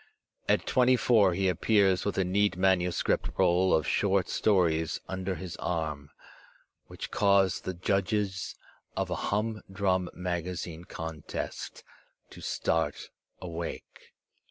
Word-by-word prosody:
At - - +3
twenty 130 0 +4
four 105 -7 +4
he 95 +1 +1
appears 95 +1 +3
with 100 - -1
a 95 - +3
neat 100 +1 +1
manuscript 90 -2 +1
roll 90 +2 +3
of 80 - +2
short 100 -3 +1
stories 85 -6 +2
under 95 0 -3
his 90 -2 -7
arm, 75 -4 -3 0.8
which - - -7
cause 100 -3 +3
the 95 - -4
judges 95 +1 -1 0.4
of - - -1
a - - 0
humdrum 100 -4 -1
magazine 90 -1 -4
contest 80 -3 -6 0.5
to - - -11
start 80 0 -1 0.3
awake. 85 -1 -7
95 Hz, 115 wpm, -29 LUFS, 85-100 Hz, 0.8 s, twenty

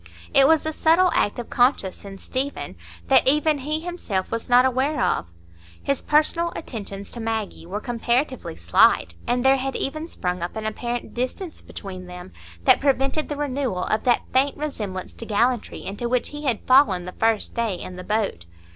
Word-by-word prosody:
It 270 0 +7
was 320 0 +4
a 315 - -1
subtle 335 +4 +4
act 205 - +1
of 240 - -7
conscience 245 -6 +1
in 195 -1 -9
Stephen 255 - -4 0.3
that - - +5
even 300 +2 +4
he 305 +4 -2
himself 325 - -3
was 230 +1 -3
not 245 +1 +6
aware 265 +4 +1
of. - - +1 0.6
His 275 -1 0
personal 335 +3 +2
attentions 200 -7 -6
to 240 - -7
Maggie 220 -6 -3
were 200 +4 -3
comparatively 245 +4 -1
slight, - - +3
and 245 +1 0
there 270 0 +6
had 270 0 -3
even 310 +4 -3
sprung 180 - -3
up 175 - -4
an 220 0 -4
apparent 240 +2 -4
distance 255 +8 -4
between 185 -2 -8
them, 180 - -9 0.3
that - - +5
prevented 275 +2 +1
the 295 - -3
renewal 265 -9 -2
of 215 - -1
that 245 -1 +3
faint 270 +2 +2
resemblance 210 -11 -5
to 230 - -9
gallantry 235 +3 0
into 220 +5 -4
which 250 0 0
he 295 0 -7
had 240 -6 -1
fallen 255 -10 +4
the 180 - -6
first 225 +1 0
day 230 -5 -1
in 180 +1 -8
the 180 - -8
boat. 200 - -2
245 Hz, 180 wpm, -23 LUFS, 205-280 Hz, 0.6 s, It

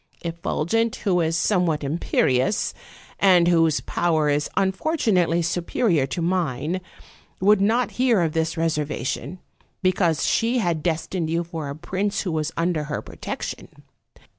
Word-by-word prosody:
Effulgent, 170 +6 -1
who 180 -3 +2
is 165 0 0
some 180 0 +2
what 150 -2 -1
imperious, 140 +1 +1 0.5
and 180 -3 +5
whose 165 -3 +3
power 160 -3 +1
is 145 +1 0
unfortunately 190 - +1
superior 170 - +1
to 170 +5 -3
mine, 170 -1 -1 0.6
would 200 +1 +4
not 230 +4 +2
hear 240 -7 +4
of 165 -2 +1
this 160 +1 -1
reservation, 150 0 -2 0.5
be 185 - +5
cause 170 -4 +1
she 235 +2 +1
had 175 -8 0
destined 165 +1 -2
you 165 +1 0
for 165 -4 -6
a 140 - -5
prince 190 +6 -2
who 185 - -3
was 155 0 -1
under 165 -2 0
her 150 0 -3
protection. - - -6
170 Hz, 140 wpm, -23 LUFS, 155-190 Hz, 0.6 s, and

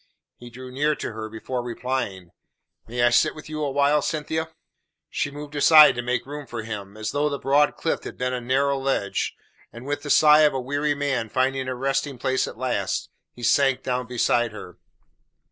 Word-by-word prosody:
He 120 - -12
drew 125 +1 -10
near 150 +3 +1
to - - -5
her 110 0 -6
before 120 +3 -4
replying. 120 -7 -4 0.6
"May 120 +1 -1
I 120 - +5
sit 155 +6 +3
with 155 - -11
you 155 0 -4
awhile, 145 +1 +2
Cynthia?" 160 +2 -2 0.6
She - - -1
moved 145 +1 -9
aside 150 +1 +8
to 120 - -3
make 125 0 -2
room 145 0 -8
for 115 -2 -6
him, 105 -2 -7
as 110 0 -3
though 145 +1 0
the 140 - -3
broad 145 +2 +2
cliff 165 - -2
had - - -8
been 125 0 -1
a 125 - -3
narrow 135 +3 +1
ledge, 135 -7 -1 0.4
and 120 +3 -11
with 145 +1 -3
the 145 - -7
sigh 150 +1 +6
of 150 -3 +4
a - - 0
weary 145 +3 -1
man 135 -6 -1
finding 130 +1 0
a 130 - -3
resting 135 +1 -1
place 130 +2 0
at - - -9
last, - - -2 0.3
he 120 - -11
sank 135 +1 +3
down 125 -1 -2
beside 120 -1 +1
her. 90 -5 -10
130 Hz, 195 wpm, -24 LUFS, 120-145 Hz, 0.6 s, aside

